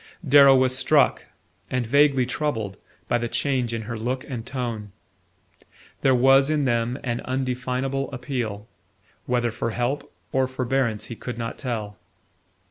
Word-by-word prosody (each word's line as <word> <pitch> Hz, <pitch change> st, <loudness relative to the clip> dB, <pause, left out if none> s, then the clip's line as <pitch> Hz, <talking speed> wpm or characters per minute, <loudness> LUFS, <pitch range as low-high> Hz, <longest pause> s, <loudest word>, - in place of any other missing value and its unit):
Darrow 140 Hz, 0 st, +8 dB
was 130 Hz, 0 st, +3 dB
struck, 135 Hz, +2 st, +3 dB, 0.4 s
and 125 Hz, -1 st, -1 dB
vaguely 140 Hz, +1 st, +4 dB
troubled, 120 Hz, -7 st, -2 dB, 0.3 s
by 120 Hz, -, +1 dB
the 120 Hz, -, -2 dB
change 130 Hz, -1 st, -1 dB
in 115 Hz, -1 st, -3 dB
her 115 Hz, 0 st, -5 dB
look 125 Hz, +3 st, -2 dB
and 120 Hz, -4 st, -5 dB
tone. 115 Hz, -6 st, -4 dB, 1.1 s
There 135 Hz, -1 st, +4 dB
was 135 Hz, +3 st, +5 dB
in 150 Hz, -2 st, +1 dB
them 120 Hz, 0 st, 0 dB
an 120 Hz, -2 st, -2 dB
undefinable 130 Hz, +1 st, -2 dB
appeal, 120 Hz, -5 st, -4 dB, 0.6 s
whether 120 Hz, -1 st, +1 dB
for 115 Hz, -, -3 dB
help 120 Hz, +5 st, -2 dB, 0.2 s
or 130 Hz, -1 st, +2 dB
forbearance 130 Hz, -3 st, -1 dB
he 115 Hz, -, -7 dB
could 125 Hz, +1 st, -6 dB
not 115 Hz, -1 st, -5 dB
tell. 110 Hz, -6 st, -4 dB
125 Hz, 140 wpm, -24 LUFS, 115-135 Hz, 1.1 s, Darrow